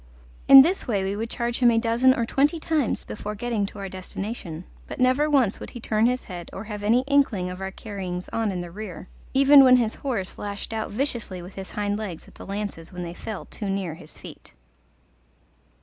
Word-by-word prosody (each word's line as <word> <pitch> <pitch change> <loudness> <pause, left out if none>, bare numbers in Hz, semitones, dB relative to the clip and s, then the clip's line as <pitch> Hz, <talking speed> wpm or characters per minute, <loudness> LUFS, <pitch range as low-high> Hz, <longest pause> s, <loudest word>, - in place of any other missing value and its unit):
In 270 -1 +11
this 360 +6 -1
way 205 -5 0
we 195 +1 -2
would 225 +2 -3
charge 235 0 -2
him 245 -2 +6
a 230 - +3
dozen 235 +3 +4
or 235 - 0
twenty 285 +7 +2
times 310 -5 0
before 210 0 -6
getting 220 -2 -1
to 205 - -11
our 200 -1 -5
destination, 185 -2 -6 0.2
but - - -8
never 255 +4 +3
once 260 -9 +2
would - - -8
he 240 - -9
turn 220 0 +2
his 250 +1 -1
head 175 -3 -8
or 195 - -7
have 210 -1 -6
any 225 +4 +3
inkling 260 -10 +1
of 180 +1 -8
our 190 - -3
carryings 190 -3 -6
on 225 -2 0
in 180 -2 -3
the 175 -1 -8
rear, 190 -3 -8 0.3
even 275 +1 +8
when 255 -1 +7
his 230 -3 +2
horse 230 -9 -4
lashed 205 +2 -5
out 220 -1 -3
viciously 230 -5 -2
with 180 +2 -11
his 195 -1 -8
hind 205 0 -1
legs 185 -7 -6
at - - -17
the - - -11
lances 200 -5 -5
when 180 -1 -6
they 170 0 -6
fell 210 +3 -7
too 205 -3 -6
near 195 -4 -2
his 160 -2 -12
feet. - - -13
210 Hz, 215 wpm, -25 LUFS, 190-245 Hz, 0.3 s, In